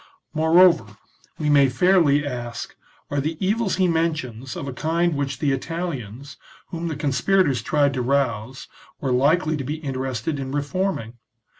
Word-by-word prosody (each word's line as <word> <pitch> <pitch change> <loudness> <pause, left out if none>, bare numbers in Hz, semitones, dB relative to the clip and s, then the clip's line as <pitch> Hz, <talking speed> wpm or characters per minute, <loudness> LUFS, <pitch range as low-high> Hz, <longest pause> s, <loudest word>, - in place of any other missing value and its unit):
Moreover, 160 - +4 0.4
we 155 - -2
may 140 -2 +5
fairly 150 0 +3
ask, 120 -4 -5 0.4
are 145 -1 0
the 155 +3 -3
evils 205 +2 0
he 185 -1 +2
mentions 155 -7 -2
of 140 - -5
a 135 - -4
kind 165 +4 0
which 140 -1 -2
the 140 +1 0
Italians, 135 - -5 0.3
whom 170 0 -4
the 160 - -3
conspirators 145 - +1
tried 145 +3 +1
to 130 - -2
rouse, 125 -2 -1 0.3
were 135 - -2
likely 155 +5 +2
to 140 - -4
be 145 +4 -3
interested 135 -2 -3
in 135 0 -5
reforming 145 - -2
145 Hz, 150 wpm, -23 LUFS, 130-165 Hz, 0.4 s, may